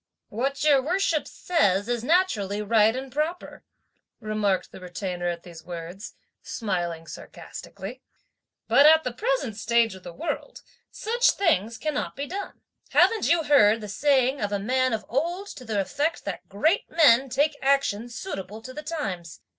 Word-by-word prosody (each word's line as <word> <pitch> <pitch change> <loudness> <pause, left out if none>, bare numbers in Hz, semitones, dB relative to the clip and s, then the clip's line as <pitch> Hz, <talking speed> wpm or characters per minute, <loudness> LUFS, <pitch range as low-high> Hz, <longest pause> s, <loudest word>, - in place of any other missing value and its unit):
"What 270 +7 -2
your 290 -3 +5
worship 335 +1 0
says 205 - +1
is 240 -1 -1
naturally 245 - +1
right 215 +1 +3
and 265 0 -6
proper," 310 +6 -3 0.6
remarked 215 -3 -1
the - - -11
Retainer 180 0 -4
at 170 -1 -3
these 170 -2 -12
words, 175 +3 -8 0.3
smiling 175 -6 -3
sarcastically, - - -9 0.7
"but 275 +6 +6
at 315 0 +6
the 250 - -3
present 435 - -1
stage 230 0 +2
of 190 - -11
the 175 - -9
world, 340 - -5 0.3
such 480 +3 +1
things 230 - +1
cannot 305 -1 -3
be 280 - -3
done. 390 +7 -6 0.3
Haven't 450 -2 +3
you 335 -1 +3
heard 225 -7 +5
the 210 - -7
saying 265 +4 +2
of 205 -1 -1
a 205 - +1
man 255 +5 +1
of 215 -2 -3
old 345 - -2
to 255 - -9
the 220 -4 -2
effect 290 - -1
that - - -6
great 315 - +1
men 270 -5 +5
take 285 +4 +1
action 265 -5 +1
suitable 220 - -6
to 255 - -8
the 300 - -6
times. 195 - -5
240 Hz, 160 wpm, -25 LUFS, 200-300 Hz, 0.7 s, but